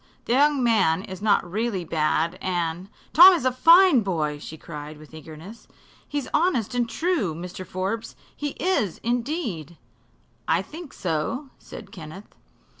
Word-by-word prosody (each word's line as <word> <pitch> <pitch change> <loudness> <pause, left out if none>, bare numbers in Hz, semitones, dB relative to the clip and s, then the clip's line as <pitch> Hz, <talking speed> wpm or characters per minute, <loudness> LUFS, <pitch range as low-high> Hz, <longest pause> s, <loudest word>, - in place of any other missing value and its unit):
The 235 - 0
young 285 0 +3
man 190 -7 +2
is 190 -3 -9
not 205 -4 +2
really 200 -1 -2
bad, 160 +2 0
and 175 0 -2
" - - -31
"Tom's 350 -4 +8
a 255 - +3
fine 330 +2 +6
boy!" 155 -7 -2
she 160 +2 -9
cried, 150 -1 -9
with 155 +1 -16
eagerness. 160 +7 -11 0.4
"He's 290 -2 -3
honest 300 - +1
and 240 -1 0
true, 310 - -1
Mr. 180 +2 -7
Forbes 195 +5 -4 0.2
he 290 -1 -4
is, 280 - 0
indeed!" 235 - -3 0.7
"I - - +2
think 320 -1 -10
so," 195 - -3
said - - -11
Kenneth. 175 +4 -11
200 Hz, 145 wpm, -24 LUFS, 165-260 Hz, 0.7 s, Tom's